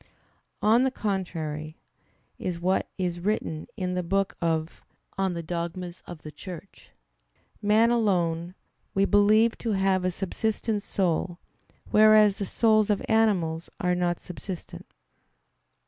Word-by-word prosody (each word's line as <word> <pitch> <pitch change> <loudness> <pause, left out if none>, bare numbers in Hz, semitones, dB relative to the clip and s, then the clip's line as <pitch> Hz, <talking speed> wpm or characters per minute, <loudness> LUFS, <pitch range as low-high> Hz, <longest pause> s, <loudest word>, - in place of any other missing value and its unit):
On 225 +3 +5
the 265 - +3
contrary, 165 - -4 0.6
Is 175 -2 -3
what 185 +2 0
is 175 -2 -2
written 175 -5 -2
in 180 -1 -2
the 180 - 0
book 195 +3 0
De 170 - +1 0.7
Eccl. 190 -3 -1
Dogm. 170 +2 -3
xvi, 175 -3 -10
xvii: 185 0 -10 0.7
"Man 220 +3 +4
alone 175 -6 +1 0.4
we 195 0 +4
believe 215 +3 +4
to 225 -3 -1
have 190 -1 +2
a 185 - +2
subsistent 210 +3 -2
soul: 175 -3 -1 0.5
whereas 215 -1 +6
the 200 - -2
souls 215 -1 +3
of 205 - 0
animals 185 -8 +1
are 180 0 +1
not 175 -1 0
subsistent." 180 0 -8
190 Hz, 120 wpm, -26 LUFS, 175-210 Hz, 0.7 s, whereas